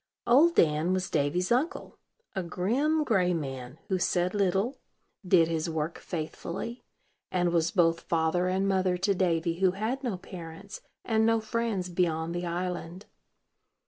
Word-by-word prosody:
Old 295 +8 +5
Dan 155 +3 +3
was 185 0 -2
Davy's 155 +6 0
uncle, 290 +10 -1 0.4
a 190 - 0
grim, 245 - 0
gray 185 -9 +2
man, 135 -3 -5
who 190 -3 0
said 175 0 +1
little, 200 +5 0 0.4
did 180 -3 +4
his 165 0 -1
work 160 0 -3
faithfully, 175 +7 -5 0.5
and 175 -1 +1
was 165 -1 +2
both 170 -4 +3
father 165 +2 +1
and 190 +2 +1
mother 185 -2 +1
to 195 +3 +1
Davy, 170 -2 0
who 190 -1 +3
had 225 +8 -2
no 230 -7 -2
parents, 180 +2 -9 0.2
and 220 -1 +2
no 225 0 +3
friends 220 -4 -2
beyond 170 -2 0
the 175 0 -3
island. 180 +2 -4
180 Hz, 145 wpm, -28 LUFS, 165-205 Hz, 0.5 s, Old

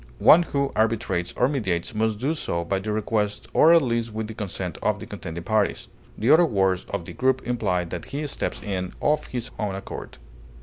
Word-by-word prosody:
One 170 - +7
who 140 -4 -1
arbitrates 110 -6 0
or 125 - +4
mediates 105 - -1
must 110 0 0
do 135 +8 0
so 85 - -2
by 95 +3 0
the 105 +2 -3
request 105 0 -1
or 160 - +6
at 170 -2 +6
least 115 -2 -1
with 110 0 -3
the 110 - -7
consent 105 -4 -5
of - - +1
the - - -7
contending 85 +1 -7
parties; 110 0 0 0.3
the 115 +5 +2
other 160 +3 +7
words 95 - +1
of 85 - -3
the - - -8
group 130 0 +1
imply 105 -7 0
that 85 0 -6
he 145 +2 -4
steps 145 - -3
in 95 -3 -3
of 150 0 +1
his 125 -1 -4
own 105 -3 -1
accord. 95 - -8
110 Hz, 205 wpm, -24 LUFS, 95-130 Hz, 0.3 s, One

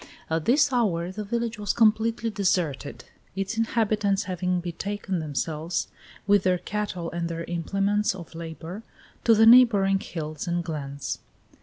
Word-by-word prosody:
At 160 -1 0
this 275 +2 +4
hour 180 -8 +1
the 210 +3 -5
village 235 +1 -2
was 205 -2 0
completely 225 0 +2
deserted, 175 -8 -1 0.3
its 195 +3 -2
inhabitants 215 -3 +1
having 180 -1 -1
betaken 185 +2 -3
themselves, 155 +2 -2 0.4
with 205 -1 +4
their 185 -1 +2
cattle 185 -3 -4
and 170 0 -3
their 165 0 -4
implements 195 +4 0
of 170 -3 -10
labor, 165 +4 -7 0.4
to 230 - +6
the 220 +1 +6
neighboring 220 -5 +6
hills 155 -4 -6
and 175 0 0
glens. 145 -4 -4
190 Hz, 140 wpm, -26 LUFS, 170-210 Hz, 0.4 s, to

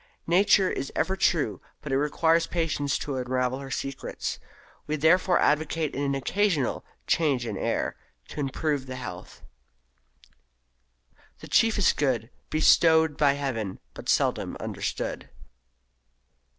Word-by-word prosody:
Nature 190 +2 +4
is 135 - -4
ever 190 - 0
true, 170 -5 +1 0.2
but 150 - -7
it - - +2
requires 165 +3 +2
patience 160 -4 -1
to 140 -3 -4
unravel 125 0 -1
her 135 -1 -8
secrets. 135 0 -4 0.5
We 155 - -1
therefore 170 +4 +3
advocate 155 0 +1
an 140 0 -1
occasional 165 0 0 0.2
"change 140 -7 +1
of - - -4
air" - - -1 0.3
to - - -8
improve 140 0 -1
the 130 - -6
health 120 -9 -9 2.0
"The - - -9
chiefest 220 -4 +3
good, 125 -5 0 0.2
Bestow'd 160 0 +4
by 145 -2 +3
Heaven, 120 -9 -3 0.2
but - - -8
seldom - - +1
understood." - - -4
145 Hz, 120 wpm, -26 LUFS, 135-165 Hz, 2.0 s, Nature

